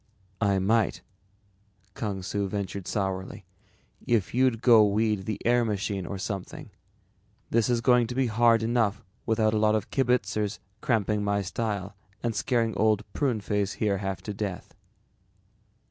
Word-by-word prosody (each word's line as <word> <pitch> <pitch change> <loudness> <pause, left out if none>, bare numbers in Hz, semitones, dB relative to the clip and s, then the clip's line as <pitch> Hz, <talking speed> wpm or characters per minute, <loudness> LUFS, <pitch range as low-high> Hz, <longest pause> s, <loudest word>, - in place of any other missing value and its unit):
"I 100 -2 +3
might," 105 +2 +1 0.9
Kung 100 -3 -4
Su 100 +1 -2
ventured 100 -1 -4
sourly, 95 -2 -3 0.6
"if 115 -5 +1
you'd 125 -2 +2
go 115 -3 +7
weed 105 -1 +1
the 110 - -2
air 120 +1 +4
machine 100 -4 -2
or 100 - -4
something. 100 -1 -6 0.8
This 115 -1 +2
is 120 -1 +1
going 120 0 +4
to 125 - -6
be 135 0 +2
hard 115 0 +3
enough 115 -2 +1 0.2
without 110 -1 +2
a 110 - +2
lot 110 0 +3
of 110 - -3
kibitzers 110 -5 0 0.2
cramping 105 -3 +1
my 100 0 0
style 100 0 -3 0.3
and 120 -1 0
scaring 115 -1 0
Old 105 -1 +2
Pruneface 105 -7 -1
here 100 -3 0
half 95 -1 -4
to 105 - -4
death." 100 -2 -5
105 Hz, 145 wpm, -27 LUFS, 100-115 Hz, 0.9 s, go